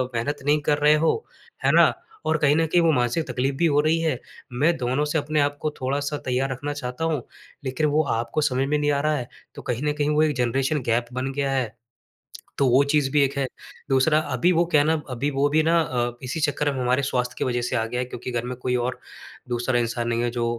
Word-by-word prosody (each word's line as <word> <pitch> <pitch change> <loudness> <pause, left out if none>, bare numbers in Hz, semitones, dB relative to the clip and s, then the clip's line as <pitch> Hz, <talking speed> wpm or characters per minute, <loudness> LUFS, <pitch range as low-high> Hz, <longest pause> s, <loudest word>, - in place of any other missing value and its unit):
मेहनत 145 +6 -1
नहीं 150 +1 +3
कर 145 0 +1
रहे 150 +1 +5
हो। 160 +1 +3 0.5
है - - +4
ना? - - +6 0.3
और 160 - +2
कहीं 150 -1 +3
न 165 0 +3
कहीं 175 +2 +3
वो 165 - +4
मानसिक 125 +3 0
तकलीफ़ 135 +2 -1
भी 170 - +2
हो 145 -2 +3
रही 155 +2 +2
है। 160 -7 0 0.3
मैं 155 +7 +2
दोनों 130 +4 0
से 150 +2 -1
अपने 150 +1 0
आप 145 0 0
को 155 - -1
थोड़ा-सा 145 +3 -1
तैयार 130 +1 0
रखना 145 +3 -4
चाहता 135 +2 -4
हूँ। 155 -6 0 0.4
लेकिन 130 +4 -1
वो 155 - +4 0.2
आपको 120 +6 -2
समझ 135 -2 +1
में 150 +1 +1
नहीं 145 0 +1
आ 140 -1 +1
रहा 155 +1 +1
है, 125 -3 -5 0.3
तो - - -8
कहीं 125 +3 -3
न 150 - 0
कहीं 145 0 +1
वो 150 +1 +3
एक 150 -2 +1
जनरेशन 135 +4 0
गैप 120 +1 +1
बन 130 +2 -2
गया 140 -1 -1
है, 125 -5 -1 0.8
तो 140 - +3
वो 130 +3 +5
चीज़ 140 -1 +1
भी 150 -1 +3
एक 140 +1 -1
है। 140 - +1 0.4
दूसरा 135 +3 +3
अभी 145 +3 +1
वो 170 -1 +3
क्या 150 - +5
है 150 - +1
ना, 160 - +3 0.2
अभी 130 +3 -1
वो 140 +1 +2
भी 155 +2 +3
ना 165 +1 +3
अ, 120 -4 -1
इसी 130 +6 -3
चक्कर 145 -1 0
में 135 - -4
हमारे 125 +2 +2
स्वास्थ्य 125 -2 -1
की - - -1
वज़ह 120 -1 0
से - - -2
आ 110 -2 +1
गया 125 +2 -3
है 125 - -1
क्योंकि 125 0 -7
घर 120 0 -2
में 125 +1 -4
कोई 125 0 -1
और 125 +1 -2 0.5
दूसरा 120 +1 0
इंसान 120 0 -2
नहीं 120 0 0
है 120 - +1
जो 120 -1 -1
140 Hz, 255 wpm, -24 LUFS, 125-150 Hz, 0.8 s, ना